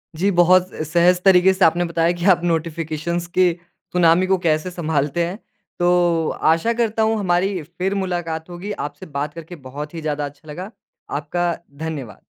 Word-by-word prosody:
जी, 185 +6 +1
बहुत 180 +1 +5 0.2
सहज 175 +3 +3
तरीक़े 190 -1 +6
से 190 0 +3
आपने 170 +2 +3
बताया 165 0 +1
कि 170 - -3
आप 175 - -4
नोटिफिकेशंस 165 0 -2
के 185 -1 +5 0.4
सुनामी 180 +1 +4
को 190 0 +3
कैसे 155 +3 +1
संभालते 160 -1 -1
हैं। 180 +4 -5 0.4
तो 175 -2 +2 0.2
आशा 195 +9 0
करता 225 -1 0
हूँ 220 0 +2
हमारी 185 0 0
फिर 180 +5 -3
मुलाकात 175 -4 -3
होगी, 175 +4 -6
आपसे 150 -3 -6
बात 145 -1 -4
करके 165 +2 -9
बहुत 150 +4 -7
ही 165 - -6
ज़्यादा 150 -1 -2
अच्छा 145 +2 -12
लगा। 185 +7 -7 0.5
आपका 175 +3 -1 0.2
धन्यवाद। 150 -7 -6
175 Hz, 165 wpm, -21 LUFS, 160-180 Hz, 0.5 s, तरीक़े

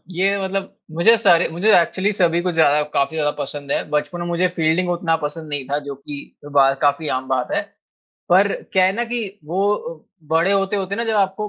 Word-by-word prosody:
ये 195 +3 +1
मतलब 195 0 -3 0.2
मुझे 205 +8 +5
सारे 180 -6 +4
मुझे 175 +6 -1
एक्चुअली 190 +4 0
सभी 175 -4 +2
को 180 0 -1
ज़्यादा 150 -2 +3
काफ़ी 140 +3 0
ज़्यादा 150 -2 +1
पसंद 145 -1 -5
है। - - 0
बचपन 150 +4 -2
में 170 - -3
मुझे 175 +1 +1
फ़ील्डिंग 165 +2 +1
उतना 170 -2 0
पसंद 155 +1 -8
नहीं 145 -2 -4
था 145 - 0
जो 140 - -5
कि 140 +2 -9 0.3
कई 145 - -10
बार 135 -1 +4
काफ़ी 145 +1 +1
आम 130 0 -11
बात 130 -2 -1
है। - - +1 0.7
पर 195 +3 +4 0.2
क्या 190 -1 +4
है 190 - +3
ना 240 - 0
कि 240 0 -3 0.2
वो 185 -1 -2 0.3
बड़े 165 +4 +3
होते-होते 195 0 -1
ना 230 - -2
जब 225 -1 0
आपको 200 +1 0
175 Hz, 210 wpm, -20 LUFS, 150-195 Hz, 0.7 s, मुझे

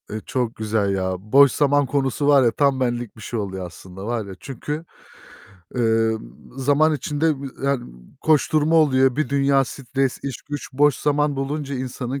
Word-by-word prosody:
Eee, 110 +1 -5
çok 125 -3 -2
güzel 105 -2 0
ya. 95 -1 -1
Boş 135 +7 +5
zaman 145 +1 +2
konusu 135 0 -1
var 140 -2 +6
ya 120 - +3
tam 140 +2 +1
benlik 120 -3 -2
bir - - -12
şey 115 - -4
oluyor 95 -2 -4
aslında 95 +2 -10
var 115 -2 -2
ya, 100 - -8
çünkü, 150 +4 -6 0.9
eee, 115 -2 +2 0.4
zaman 145 +4 +3
içinde 150 0 -1
b - - -4 0.2
yani, 140 -3 0 0.4
koşturma 155 0 +2
oluyor. 135 -4 +4
Bir 155 - 0
dünya 140 -1 +3
stres, 135 0 -2
iş, 135 -4 -5
güç 145 -1 -7
boş 145 +1 +3
zaman 145 -1 +1
bulunca 140 +1 -3
insanın 130 +1 -4
135 Hz, 165 wpm, -22 LUFS, 115-145 Hz, 0.9 s, var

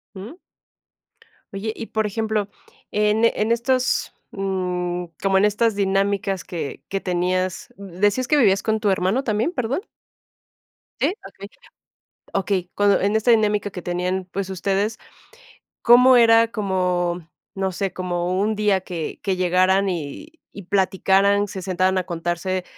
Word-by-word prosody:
Mm. 215 - -9 1.2
Oye, 200 +3 -3
y 230 - -5
por 220 0 -1
ejemplo, 215 -1 -2 0.4
en, 210 +1 +1
eh, - - +4
en 215 +2 0
estos, 255 +2 0 0.2
mm, 180 -3 -2 0.2
como 195 -1 +2
en 195 - +4
estas 215 +1 +1
dinámicas 195 -1 0
que 165 -5 -6
que 195 - -1
tenías, 185 0 -2
¿d-decías 200 +6 -1
que 300 - +3
vivías 200 -7 +3
con 220 0 0
tu 210 - +2
hermano 190 +7 +1
también, 220 +6 0
perdón? 250 +1 -1 1.2
¿Sí? - - +2 0.2
Okey, - - -9 0.8
okey. 190 -2 -1
Cuando 205 -1 +3
en 205 +2 +1
esta 220 +2 +3
dinámica 210 -2 +2
que 180 - -7
tenían, 180 +1 -2
pues, 195 0 -3
ustedes, 195 +3 -1 0.8
¿cómo 250 +2 +7
era 230 -1 +6
como 180 -5 -1 0.2
no 190 -1 -2
sé, 190 0 -3
como 180 0 -2
un 215 +1 0
día 205 -3 +1
que 170 -4 -6
que 195 -2 -1
llegaran 185 +2 +2
y 155 - -5 0.2
y 200 - -10
platicaran, 195 +1 +2
se 190 -1 -7
sentaran 185 +1 0
a 185 - -1
contarse 175 +2 -3
195 Hz, 140 wpm, -22 LUFS, 185-210 Hz, 1.2 s, cómo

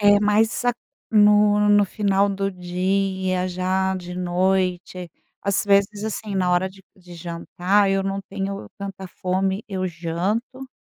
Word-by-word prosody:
É 205 0 +6
mais 215 +3 +2
a 245 - +3 0.4
no 210 -1 +5
no 205 0 +5
final 200 0 +1
do 195 0 -1
dia, 185 0 -1
já 185 +1 0
de 180 -1 -7
noite, 180 -1 -1 0.3
às 200 -1 0
vezes, 200 +1 +2
assim, 215 -1 -4
na 185 -1 +1
hora 180 +1 +2
de 195 0 -17
de 180 -2 -14
jantar, 175 +4 0
eu 195 0 +1
não 195 0 -2
tenho 195 0 -4
tanta 195 -1 -6
fome, 190 +3 -1
eu 185 -2 -2
janto. 185 +10 -3
195 Hz, 145 wpm, -23 LUFS, 185-205 Hz, 0.4 s, É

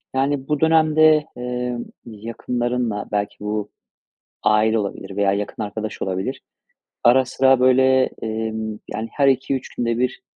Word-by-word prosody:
Yani, 135 0 0
bu 150 -1 0
dönemde, 155 -1 +4
emm, 125 -1 -3 0.2
yakınlarınla, 115 0 -3
belki 105 -1 -1
bu 105 0 -3 0.7
aile 110 +1 +3
olabilir 100 -1 -5
veya 100 -1 +2
yakın 105 +2 -3
arkadaş 105 +1 -5
olabilir, 95 +8 -3 0.6
ara 130 +2 +5
sıra, 130 0 +3
böyle, 130 +1 +4
emm, 110 -1 -3
yani, 110 +1 -3
her 140 -1 +2
2-3 135 0 0
günde 115 -1 -1
bir, 125 +1 -1
120 Hz, 125 wpm, -21 LUFS, 110-130 Hz, 0.7 s, ara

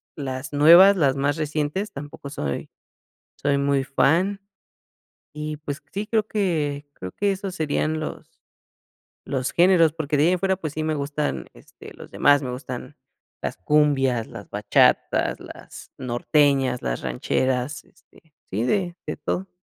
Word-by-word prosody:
las 135 0 -5
nuevas, 170 +7 +7
las 140 -6 +3
más 145 +3 0
recientes, 155 +6 -2
tampoco 140 0 -8
soy 75 - -4 0.7
soy 140 0 0
muy 140 -1 +1
fan. 170 +9 +2 1.0
Y 150 0 -5
pues 145 -1 -6
sí, 205 +2 -3
creo 220 -1 +1
que 150 -9 -1
creo 95 0 -8
que 200 -1 0
esos 195 -1 -5
serían 155 -1 -1
los 155 - -8 0.9
los 130 -1 -2
géneros, 170 -3 +4
porque 155 -2 -2
de 145 - +4
ahí - - +4
en 180 - -1
fuera 190 0 +1
pues 155 -5 -5
sí 155 - -3
me 155 0 -1
gustan 145 +1 -2
este - - -14
los - - -13
demás, 145 0 +4
me 125 - -3
gustan 125 0 -7 0.4
las - - -3
cumbias, 135 0 +2
las - - -10
bachatas, - - +2
las - - -12
norteñas, 130 +1 +1
las - - -3
rancheras, 130 - -1
este 175 -4 -25 0.2
sí, 105 +4 -1
de 180 +2 0
de 150 - -2
todo. 185 +6 -3
150 Hz, 150 wpm, -23 LUFS, 135-170 Hz, 1.0 s, nuevas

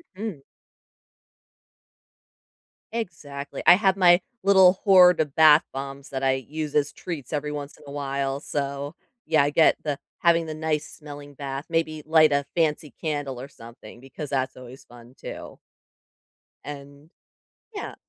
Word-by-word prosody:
Mhm. 195 -8 -6 2.5
Exactly, 150 -11 -6
I - - +9
have 195 -1 +2
my 175 -1 +6 0.2
little 190 -2 +6
horde 180 -3 +6
of 150 -3 -1
bath 155 -1 +7
bombs 135 +1 -7
that 135 0 -4
I 135 0 +3
use 150 +3 -5
as 145 -1 +2
treats 150 -8 -7
every 150 0 -2
once 145 -1 -6
in - - -18
a - - -9
while, 140 -1 -3
so 140 +1 -4 0.3
yeah, 155 -3 +3
I 145 - +1
get 155 +2 +4
the 145 -2 -2 0.2
having 170 -1 +3
the 155 - -5
nice 155 -1 -2
smelling 145 -1 -11
bath, 140 +1 -6
maybe 160 -2 -1
light 155 -1 +5
a 140 0 +1
fancy 155 -3 0
candle 145 -5 -3
or 135 - -8
something 115 -3 -14
because 135 +3 -8
that's 130 -2 -2
always 125 +1 -12
fun, 120 +1 -16
too. - - -9 1.0
And 140 +1 -10 0.7
yeah. 410 - -6
145 Hz, 145 wpm, -24 LUFS, 140-160 Hz, 2.5 s, I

